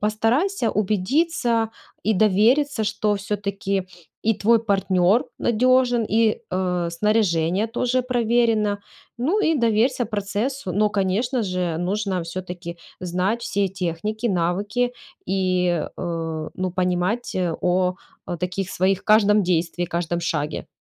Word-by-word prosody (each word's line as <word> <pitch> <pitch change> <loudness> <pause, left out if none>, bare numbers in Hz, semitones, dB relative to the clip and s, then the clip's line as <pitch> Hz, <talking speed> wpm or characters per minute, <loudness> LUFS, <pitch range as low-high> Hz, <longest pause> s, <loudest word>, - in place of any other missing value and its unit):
постарайся 230 - +1
убедиться 225 - +1 0.3
и 220 - +1
довериться, 220 +7 +3
что 210 0 0
всё-таки 200 -1 -2 0.4
и 225 - +4
твой 230 +3 +3
партнер 195 -1 +2
надежен, 245 0 +3
и, 220 0 +2
э, 180 -2 -1
снаряжение 185 -1 +1
тоже 250 +2 0
проверено. 230 -4 +1 0.4
Ну 325 - +1
и 325 -5 +2
доверься 240 0 +2
процессу. 210 +2 -3
Но, 210 +3 +2
конечно 210 +6 0
же, 180 -4 -1
нужно 190 0 -1
всё-таки 175 0 -6 0.2
знать 185 +6 -1
все 200 -4 0
техники, 190 +5 -3
навыки 205 +7 0 0.4
и, 185 -3 +1
э, 165 -3 -3
ну, 185 0 -2
понимать 180 +6 -1 0.2
о 180 0 +1 0.5
таких 185 +1 -3
своих 190 +1 +1
каждом 210 -1 +5
действии, 175 -1 0
каждом 170 0 -2
шаге. 150 -2 -2
205 Hz, 110 wpm, -23 LUFS, 180-230 Hz, 0.5 s, каждом